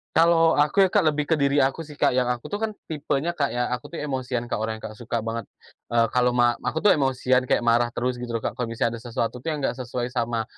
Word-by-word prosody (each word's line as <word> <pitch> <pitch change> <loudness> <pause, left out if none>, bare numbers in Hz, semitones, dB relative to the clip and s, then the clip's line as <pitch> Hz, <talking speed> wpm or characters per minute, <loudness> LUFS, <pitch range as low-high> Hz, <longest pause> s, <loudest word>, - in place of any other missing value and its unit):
Kalau 165 -2 +5
aku, 150 +7 +4
ya 190 - +3
Kak, 200 -6 +3
lebih 150 -1 +1
ke 160 +1 0
diri 140 0 +3
aku 140 +4 -1
sih, 150 - -11
Kak. - - +2
Yang 125 -1 +1
aku 120 - -11
tuh 205 - -2
kan, 220 0 -1
tipenya 150 +1 -2
Kak 145 -4 0
ya, 120 0 -2
aku 125 +4 -3
tuh 170 - -10
emosian 130 -5 -3
Kak, 120 - -3
orangnya 110 0 -4
Kak, 110 - -14
suka 115 -1 -3
banget, 115 -1 -4 0.4
eee, 115 -1 +2
kalo 125 0 +2
ma 120 -1 +4
aku 160 - -3
tuh 210 - +7
emosian, 130 -2 +2
kayak - - +2
marah 120 0 +3
terus 125 0 -1
gitu 120 -1 -4
loh 115 - -3
Kak, 115 - -4
kalau 125 - -1
misalnya 115 0 -2
ada - - -16
sesuatu 115 +1 -2
tuh 130 - -10
yang 150 -3 -2
enggak 130 - -1
sesuai 125 0 -3
sama 115 -1 -1
125 Hz, 260 wpm, -24 LUFS, 120-150 Hz, 0.4 s, tuh